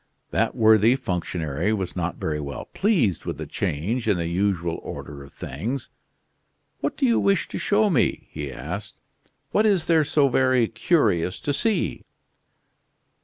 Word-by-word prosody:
That - - +1
worthy 110 +2 +5
functionary 90 - -2
was 95 -4 -3
not 90 -1 -2
very 75 -1 -2
well 70 -1 -6
pleased 165 - +1
with - - -4
the - - -5
change 110 - -2
in 105 -4 +3
the 85 - -2
usual 85 -1 0
order 70 -1 -8
of 70 - -14
things. 115 - -5 0.9
"What - - -2
do 275 - +2
you 235 -2 +3
wish 200 -1 +2
to - - -4
show 210 +1 +3
me?" 140 - +1
he 75 -3 -5
asked. 90 - -6 0.6
"What 215 +1 +3
is 190 -6 +2
there 160 -2 +4
so 145 -1 +3
very 130 -2 +3
curious 110 - +1
to 145 - -1
see?" 220 +8 0
105 Hz, 155 wpm, -24 LUFS, -, 0.9 s, worthy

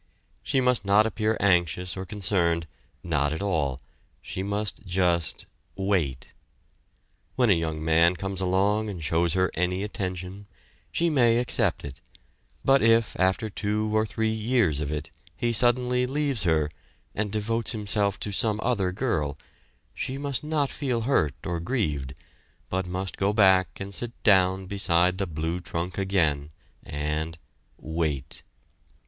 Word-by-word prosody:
She 135 - 0
must 125 -1 +2
not 100 +2 +4
appear 110 0 0
anxious 90 -2 +2
or 95 0 -6
concerned 85 -5 +1 0.4
not 75 -4 0
at 80 - -4
all; 70 -9 -1 0.4
she 95 - -6
must 100 +2 -3
just 90 -3 +1 0.3
wait. 90 -10 -1 1.0
When 125 -4 +4
a - - +8
young 80 -2 -2
man 85 +2 +4
comes 95 +1 -4
along 100 +4 +1
and 90 -5 -6
shows 80 +2 +1
her 95 0 +2
any 90 +3 0
attention, 95 -1 -5 0.4
she 170 0 +1
may 120 -5 +4
accept 115 -8 0
it, 70 -1 -9 0.6
but 135 0 +5
if 115 0 +3
after 95 +3 +2
two 105 +1 -1
or 110 0 +2
three 110 +1 -1
years 110 - +1
of 75 -1 -3
it 75 -1 -4 0.3
he 120 +4 0
suddenly 125 +2 +2
leaves 140 -6 0
her, 80 -3 +2 0.4
and 105 -1 -2
devotes 115 +2 -1
himself 105 -3 0
to 105 - -2
some 105 +1 +1
other 105 -7 +1
girl, 85 - -1 0.6
she 130 - -4
must 140 -2 -3
not 150 -3 0
feel 130 -5 -1
hurt 110 - +1
or 85 -1 -2
grieved 75 - -2 0.6
but 95 0 -1
must 95 +1 -4
go 100 +1 +1
back 95 -3 +4
and 100 0 -6
sit 120 +3 -2
down 95 -2 +4
beside 90 -1 +2
the 95 - -1
blue 80 +2 -3
trunk 90 +2 -4
again 80 -7 +1 0.3
and 75 +2 -3 0.4
wait! 75 -4 -3
95 Hz, 145 wpm, -26 LUFS, 85-110 Hz, 1.0 s, a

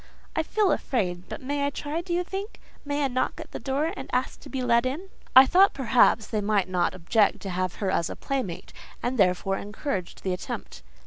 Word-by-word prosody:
"I 320 - +2
feel 405 +4 +1
afraid: 180 -8 -1
but - - -7
may 285 +2 -1
I 285 - +2
try, 295 +3 -3
do 345 0 -8
you 350 +1 +1
think? 390 +4 -6 0.2
May 285 0 0
I - - +3
knock 255 0 -1
at - - -9
the - - -5
door, 290 +5 -1
and - - -7
ask 250 +1 -1
to - - -12
be 265 -2 -3
let 235 -1 +4
in?" 295 +10 -3 0.3
I 260 +1 +11
thought 375 +7 +5
perhaps 240 -4 +4
they 215 0 -2
might 200 -2 +1
not 180 -1 0
object 200 +4 +2
to 195 - -5
have 185 0 -1
her 195 -3 -1
as 170 - 0
a - - -5
playmate, 255 -11 -4 0.3
and 250 0 -1
therefore 195 +1 +2
encouraged 205 - -4
the 185 - 0
attempt. 180 - -6
250 Hz, 215 wpm, -26 LUFS, 195-290 Hz, 0.3 s, I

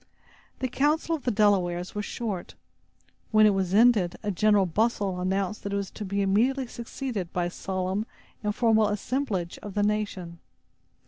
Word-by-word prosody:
The 260 - +1
council 300 +6 +1
of 295 - -9
the - - +2
Delawares 185 -4 +2
was 210 0 -3
short. 210 -7 -4 0.7
When 215 -1 +5
it 210 - +6
was 190 -2 -1
ended, 210 -4 +4
a 205 - 0
general 205 +1 +3
bustle 200 0 0
announced 190 +2 -1
that 200 - -4
it - - +1
was 200 -1 -3
to 215 - -7
be 200 0 -1
immediately 245 +8 +2
succeeded 235 -5 -5
by 175 -1 0
a 175 - -3
solemn 190 +3 -2 0.4
and 210 0 -1
formal 220 -3 +4
assemblage 205 -4 -2
of 205 -2 -9
the 205 - +2
nation. 205 -5 -2
205 Hz, 170 wpm, -27 LUFS, 185-225 Hz, 0.7 s, it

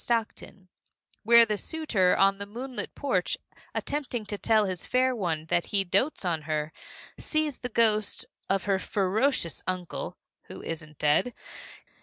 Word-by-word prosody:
Stockton, 225 -4 -3 0.5
where 235 +1 +7
the 210 -2 -2
suitor 235 - +1
on 195 0 +4
the 200 - -5
moonlit 250 +5 -6
porch, 195 -11 0 0.4
attempting 265 -6 -2
to 205 - -4
tell 215 +2 +3
his 185 -2 -3
fair 255 0 +2
one 165 -7 -2
that 175 - +2
he 200 -1 +1
dotes 195 - 0
on 165 -3 0
her, 155 0 -1 0.5
sees 310 -3 0
the 250 - -4
ghost 215 -3 +3 0.2
of 195 0 +1
her 195 -2 +1
ferocious 200 - +1
uncle 185 -2 -3 0.3
(who - - -10
isn't 155 -2 -6
dead!) 150 +12 +2
205 Hz, 145 wpm, -28 LUFS, 180-245 Hz, 0.5 s, where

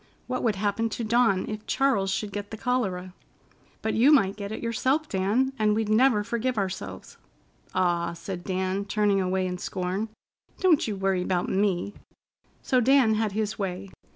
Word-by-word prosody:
What 255 0 -3
would 225 -4 +1
happen 205 +3 0
to 230 - -4
Dawn 220 -4 +2
if 215 0 -6
Charles 255 -8 +2
should 200 +2 -2
get 205 0 -5
the 220 - -7
cholera? 195 -7 -1 0.7
"But 220 - 0
you 250 +7 +5
might 200 -10 +4
get 200 -1 -6
it 220 - -5
yourself, 260 +6 0
Dan, 215 +7 +1
and 210 -1 +3
we'd 220 -1 -1
never 220 -1 +4
forgive 235 +2 -2
ourselves." 190 -2 -4 0.6
"Aw!" 175 -2 +1
said 175 +1 -6
Dan, 190 +1 -1
turning 205 -1 +2
away 185 0 0
in 180 -1 -3
scorn. 185 +5 -3 0.5
"Don't 350 -9 +3
you 210 - -2
worry 190 -1 0
'bout 180 -1 -1
me." 195 0 0 0.7
So 255 -2 +2
Dan 260 -2 +4
had 215 -2 0
his 215 0 -2
way. 190 0 -4
205 Hz, 170 wpm, -26 LUFS, 190-230 Hz, 0.7 s, you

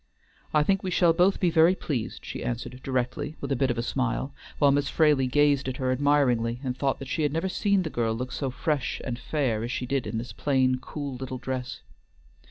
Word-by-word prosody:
"I 150 -1 +4
think 195 +4 +2
we 190 - -3
shall 170 -2 +4
both 180 +4 +3
be 180 -3 +2
very 165 +3 +5
pleased," 130 -12 -4
she - - -5
answered 125 +1 -4
directly, 135 +4 -2
with 140 - -5
a - - +3
bit 130 +1 +1
of 120 - -1
a 115 - -1
smile; 130 +2 -1 0.2
while 145 -2 +5
Miss 140 0 +1
Fraley 150 -5 +3
gazed 145 0 +3
at 130 -1 -3
her 130 -2 0
admiringly, 130 -4 +2
and 125 -2 -2
thought 135 0 -1
she 160 - -2
had 150 -2 +1
never 165 +5 -1
seen 200 0 +1
the 160 - -3
girl 115 -2 0
look 125 +2 -4
so 135 - -2
fresh 140 +1 -1
and 120 -2 -4
fair 130 -9 -1
as 120 - -3
she 125 - -2
did 135 0 -1
in 115 - -3
this 120 +2 -5
plain, 130 -3 +1
cool 140 +1 -6
little 130 0 -5
dress. 125 0 -4
135 Hz, 220 wpm, -27 LUFS, 125-150 Hz, 0.2 s, very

